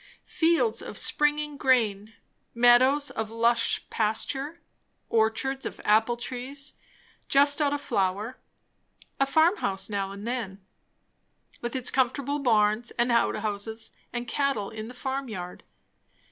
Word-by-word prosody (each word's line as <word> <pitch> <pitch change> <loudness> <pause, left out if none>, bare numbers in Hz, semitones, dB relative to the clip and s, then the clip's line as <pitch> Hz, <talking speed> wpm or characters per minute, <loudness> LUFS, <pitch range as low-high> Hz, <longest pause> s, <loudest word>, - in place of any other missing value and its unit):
Fields 340 +7 +1
of - - -8
springing 295 0 +1
grain; 225 -6 +1 0.4
meadows 255 +4 +5
of 220 -1 -4
lush 230 +1 +1
pasture; 270 +8 -2 0.5
orchards 230 +5 0
of - - -5
apple 220 +3 +3
trees 260 +4 -6 0.6
just 285 +2 +4
out 285 -1 +2
of 290 - -1
flower; 200 +6 -1 0.8
a 275 - +3
farmhouse 275 - +1
now 195 -1 -1
and 200 +2 -8
then, 230 -6 -4 1.0
with 240 +2 -4
its 255 -2 +2
comfortable 275 +2 0
barns 220 -2 +2
and 240 0 +2
outhouses 220 -1 -1 0.2
and 240 0 -4
cattle 275 -7 -1
in 220 0 -7
the 250 - -10
farmyard. 245 -10 -5
240 Hz, 120 wpm, -27 LUFS, 215-275 Hz, 1.0 s, meadows